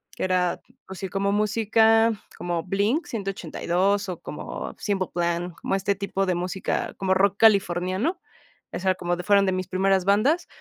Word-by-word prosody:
que -, -, -4 dB
era, 180 Hz, -1 st, +1 dB, 0.3 s
pues, 190 Hz, -1 st, -9 dB
sí, 190 Hz, -, -3 dB
como 200 Hz, 0 st, 0 dB
música, 220 Hz, +2 st, +3 dB, 0.3 s
como 175 Hz, -2 st, -2 dB
Blink 205 Hz, -, 0 dB
182 195 Hz, -1 st, -1 dB
o 180 Hz, -, -5 dB
como -, -, -7 dB
Simple 195 Hz, -3 st, -1 dB
Plan, 175 Hz, 0 st, -1 dB
como -, -, -1 dB
este 195 Hz, +1 st, 0 dB
tipo 195 Hz, 0 st, -2 dB
de 185 Hz, -2 st, 0 dB
música, 180 Hz, +2 st, -2 dB
como 190 Hz, -1 st, +1 dB
rock 195 Hz, +1 st, +2 dB
californiano, 200 Hz, -, +2 dB, 0.5 s
o -, -, -3 dB
sea, 185 Hz, 0 st, +1 dB
como 175 Hz, -1 st, -2 dB
de 180 Hz, -, -6 dB
fueron 200 Hz, 0 st, +4 dB
de 190 Hz, -, +1 dB
mis 185 Hz, -1 st, -3 dB
primeras 190 Hz, 0 st, +2 dB
bandas. 240 Hz, -, +2 dB
195 Hz, 170 wpm, -25 LUFS, 180-205 Hz, 0.5 s, fueron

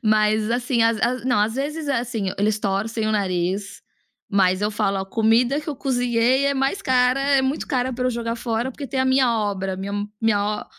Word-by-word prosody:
Mas 215 Hz, 0 st, +2 dB
assim, 240 Hz, 0 st, +1 dB
as 225 Hz, -1 st, +2 dB
as 250 Hz, +1 st, 0 dB
não 250 Hz, -5 st, +2 dB
às 215 Hz, +2 st, +1 dB
vezes 295 Hz, +3 st, -3 dB
é, 265 Hz, -4 st, +1 dB
assim, 230 Hz, -5 st, -3 dB
eles 210 Hz, +1 st, +1 dB
torcem 215 Hz, +3 st, -1 dB
o 215 Hz, -, 0 dB
nariz, 195 Hz, 0 st, -2 dB, 0.5 s
mas 190 Hz, -1 st, +2 dB
eu 210 Hz, -, +1 dB
falo: 200 Hz, -2 st, 0 dB
"Ó, 190 Hz, -, -3 dB
comida 230 Hz, +7 st, +2 dB
que 300 Hz, -, -10 dB
eu 285 Hz, -, -3 dB
cozinhei 250 Hz, 0 st, +1 dB
é 280 Hz, -, +1 dB
mais 270 Hz, +7 st, 0 dB
cara, 255 Hz, +1 st, +2 dB
é 275 Hz, -1 st, +3 dB
muito 265 Hz, +3 st, -2 dB
cara 255 Hz, -1 st, -1 dB
pra 250 Hz, +1 st, -3 dB
eu -, -, +2 dB
jogar 230 Hz, 0 st, -3 dB
fora 230 Hz, +2 st, -2 dB
porque 280 Hz, +2 st, -7 dB
tem 260 Hz, +1 st, -2 dB
a 260 Hz, -, +2 dB
minha 260 Hz, -1 st, +3 dB
obra 195 Hz, -2 st, -2 dB
minha 195 Hz, +1 st, -5 dB, 0.3 s
minha 210 Hz, -1 st, 0 dB
230 Hz, 210 wpm, -22 LUFS, 210-260 Hz, 0.5 s, é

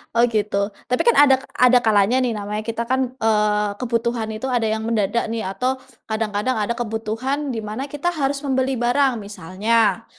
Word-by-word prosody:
Oh, 240 Hz, +1 st, +4 dB
gitu, 205 Hz, -2 st, 0 dB, 0.2 s
tapi 250 Hz, -, 0 dB
kan 475 Hz, -, +3 dB
adak 265 Hz, -2 st, +3 dB, 0.2 s
ada 250 Hz, 0 st, +5 dB
kalanya 220 Hz, +3 st, +3 dB
nih 235 Hz, -4 st, -1 dB
namanya 210 Hz, +1 st, -4 dB
kita 230 Hz, +1 st, -3 dB
kan, 260 Hz, +1 st, -1 dB
eee, 210 Hz, -2 st, +2 dB
kebutuhan 235 Hz, -2 st, -1 dB
itu 220 Hz, +4 st, -5 dB
ada 240 Hz, -4 st, 0 dB
yang 220 Hz, 0 st, -2 dB
mendadak 225 Hz, 0 st, 0 dB
nih 225 Hz, 0 st, -3 dB
atau, 250 Hz, +7 st, -1 dB, 0.3 s
kadang-kadang 220 Hz, +2 st, -1 dB
ada 220 Hz, +2 st, -2 dB
kebutuhan 240 Hz, +5 st, -3 dB
di 225 Hz, -4 st, -4 dB
mana 240 Hz, +7 st, -5 dB
kita 295 Hz, +5 st, -2 dB
harus 285 Hz, -3 st, -1 dB
membeli 265 Hz, -1 st, 0 dB
barang 245 Hz, +1 st, +2 dB
misalnya, 205 Hz, +2 st, 0 dB
230 Hz, 170 wpm, -21 LUFS, 215-255 Hz, 0.3 s, ada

